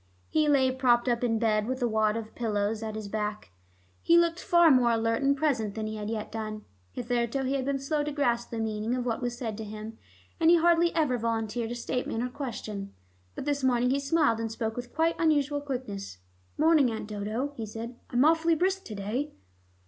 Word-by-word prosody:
He 310 -1 +2
lay 265 -3 +4
propped 255 -2 +2
up 240 0 +1
in 225 -2 +2
bed, 215 -1 +1
with 260 +1 -2
a - - +3
wad 220 -1 +1
of 220 -1 -7
pillows 215 -2 -1
at 220 -1 -4
his 215 -1 -5
back. 210 - -4 0.5
He 335 - +5
looked 340 0 +3
far 345 -2 +5
more 250 -3 +5
alert 230 +1 +1
and 280 +1 +2
present 245 -9 0
than 220 -1 -3
he 215 0 -4
had 210 0 -4
yet 220 -2 -4
done. 215 -1 -5 0.3
Hitherto, 245 +2 -1
he 265 +1 -1
had 270 -2 -1
been 280 0 0
slow 290 +2 -1
to 300 - -3
grasp 240 -5 0
the 230 - -5
meaning 220 +1 -1
of 250 -1 -2
what 235 -1 -1
was 245 -1 -3
said 225 -5 -4
to - - -4
him, 215 +1 -8 0.4
and 325 0 +5
he 345 - +8
hardly 340 0 +4
ever 275 -7 +1
volunteered 225 0 -2
a 240 - -4
statement 240 -1 -2
or 250 - -2
question, 215 -7 -6 0.4
but - - -5
this 285 -2 -1
morning 250 -1 +3
he 275 - +2
smiled 275 -5 +2
and 225 -1 -3
spoke 220 0 -3
with 245 0 -6
quite 325 +2 +2
unusual 290 -3 +2
quickness. 245 - -5 0.4
"Morning, 310 -4 +4
Aunt 220 -2 -5
Dodo," 215 +7 -3
he 225 -4 -5
said. 230 +3 -7
"I'm 245 +3 +3
awfully 330 +1 +4
brisk 380 +4 0
to 215 - -7
day." 230 +9 -3
240 Hz, 215 wpm, -28 LUFS, 220-280 Hz, 0.5 s, he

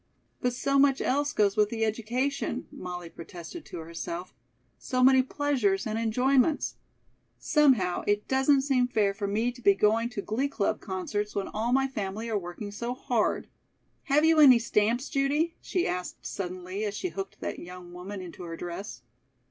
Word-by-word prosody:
"But 250 -1 +1
so 275 +2 +1
much 275 -1 +4
else 285 +2 +1
goes 205 -7 +2
with 210 -1 +3
the 225 0 0
education," 235 +6 -2
Molly 180 -1 -6
protested 170 - -9
to - - -8
herself. 170 +2 -6 0.5
"So 255 0 0
many 260 0 +7
pleasures 255 -8 0
and 220 +1 -2
enjoyments. 255 +6 +2 0.6
Somehow, 255 - +3
it 205 0 +1
doesn't 265 +1 +3
seem 260 -3 +2
fair 210 -5 +1
for 200 0 -3
me 220 +5 0
to 245 0 -14
be 200 -3 +5
going 220 +3 +2
to 210 -5 -5
glee 245 +7 0
club 220 -7 -1
concerts 205 +2 -3
when 200 - -2
all 225 +3 -2
my 270 +1 +3
family 215 -3 -4
are 210 - +1
working 185 +3 -7
so 235 +4 -4
hard." - - 0 0.6
"Have 300 +2 +3
you 320 -1 +5
any 265 -5 +9
stamps, 235 +2 +1
Judy?" 290 +5 +1
she 360 - -1
asked 180 0 -4
suddenly, 185 +1 -4
as 205 -1 -2
she 370 - -2
hooked 390 +2 -6
that - - -4
young 180 0 -10
woman 190 +2 -7
into 180 0 -9
her 165 -1 -6
dress. 175 - -6
220 Hz, 170 wpm, -28 LUFS, 195-265 Hz, 0.6 s, any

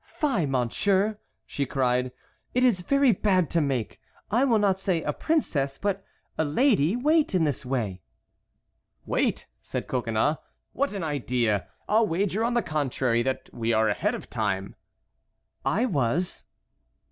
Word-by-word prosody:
"Fie, 235 - +1
Monsieur!" 190 - +1 0.3
she 140 - -2
cried, 125 -1 +1 0.4
"it 250 - +3
is 230 -8 +3
very 275 +6 +3
bad 185 -4 +1
to 170 - +2
make—I 140 - -2
will 235 -5 +3
not 195 -2 +2
say 180 -4 0
a 150 - -1
princess—but 195 - -1 0.4
a - - +4
lady—wait 245 - +2
in 175 - +3
this 145 -4 -1
way." 115 -8 -2 1.0
"Wait?" - - 0 0.2
said - - -4
Coconnas, 120 +4 0 0.4
"what 280 -5 -1
an 195 - -3
idea! 125 - 0 0.2
I'll 220 +1 +3
wager, 195 +5 0
on 240 +1 0
the 240 - +2
contrary, 130 -5 0
that 130 +2 -3
we 115 0 -1
are 110 0 +3
ahead 105 - 0
of - - -8
time." 95 0 -2 0.9
"I 225 +7 +1
was." 160 - -1
160 Hz, 135 wpm, -26 LUFS, 125-210 Hz, 1.0 s, a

